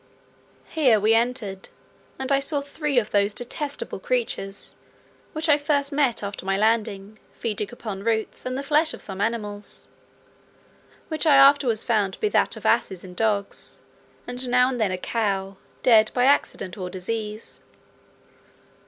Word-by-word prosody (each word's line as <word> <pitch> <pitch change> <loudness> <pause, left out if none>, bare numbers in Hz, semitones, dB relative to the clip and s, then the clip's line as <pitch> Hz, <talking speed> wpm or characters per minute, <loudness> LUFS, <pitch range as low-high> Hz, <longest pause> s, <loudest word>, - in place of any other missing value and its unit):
Here 260 -9 +3
we 215 +2 +3
entered, 225 -5 -1 0.5
and 265 +1 -3
I 275 - +4
saw 285 +1 -1
three 285 0 -3
of 215 -3 +2
those 205 0 +2
detestable 285 +4 -4
creatures, 450 - -2 0.6
which 315 +1 -2
I 295 -1 +5
first 285 -1 0
met 275 -6 +1
after 200 -2 -5
my 195 0 0
landing, 215 -1 0
feeding 210 -3 -3
upon 215 -5 -6
roots, 220 -1 -1
and 255 0 -3
the 275 - -3
flesh 305 +3 +2
of - - -13
some 195 -1 -6
animals, 210 -2 -3 1.2
which 315 0 0
I 290 - +7
afterwards 275 -5 +5
found 205 -4 +1
to - - -24
be 425 - +1
that - - +1
of - - -11
asses 190 -3 +1
and 180 -1 -11
dogs, 205 -2 -2 0.5
and 245 +1 -5
now 250 +1 +4
and 250 -3 -3
then 210 - +2
a 185 - -2
cow, 195 -2 -2 0.3
dead 220 -3 +6
by 250 - +3
accident 200 -9 +1
or 180 -1 -4
disease. 210 +4 -5
225 Hz, 155 wpm, -24 LUFS, 205-275 Hz, 1.2 s, I